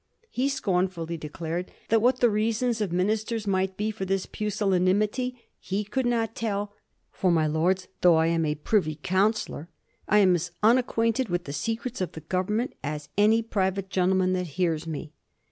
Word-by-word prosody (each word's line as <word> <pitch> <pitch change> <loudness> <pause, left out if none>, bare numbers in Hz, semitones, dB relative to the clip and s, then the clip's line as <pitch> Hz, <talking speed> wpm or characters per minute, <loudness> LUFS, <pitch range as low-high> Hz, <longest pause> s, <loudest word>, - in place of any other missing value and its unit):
He 260 +3 0
scornful 185 -8 0
ly 170 - -3
declared 165 +3 -5 0.2
that 225 0 +4
what 250 +2 +2
the 240 - +6
reasons 225 +2 0
of 200 -5 -1
ministers 215 +4 0
might 190 -1 0
be 215 +1 -1
for 210 -2 -6
this 190 0 -1
pusillanimity 210 +4 0 0.2
he 195 +3 -2
could 240 +5 -1
not 230 -2 0
tell, 205 -3 -2 0.2
" - - -47
for, 185 - +1
ray 160 -2 +3
Lords, 175 +5 +1
though 175 -2 +6
I 160 0 +3
am 165 0 +1
a 150 -1 0
privy 155 0 0
councillor 190 -4 0 0.4
I 210 - +4
am 190 -3 +6
as 175 0 -1
unacquainted 230 +1 +2
with 175 0 -1
the 140 - -6
secrets 225 - -3
of 185 - -2
the 160 - -8
Government 190 - -1
as 150 0 -4
any 220 +3 +4
private 195 -3 -1
gentle 185 0 +2
man 185 0 +2
that 180 -1 -1
hears 165 -3 0
me." 155 -1 -6
190 Hz, 180 wpm, -26 LUFS, 175-220 Hz, 0.4 s, the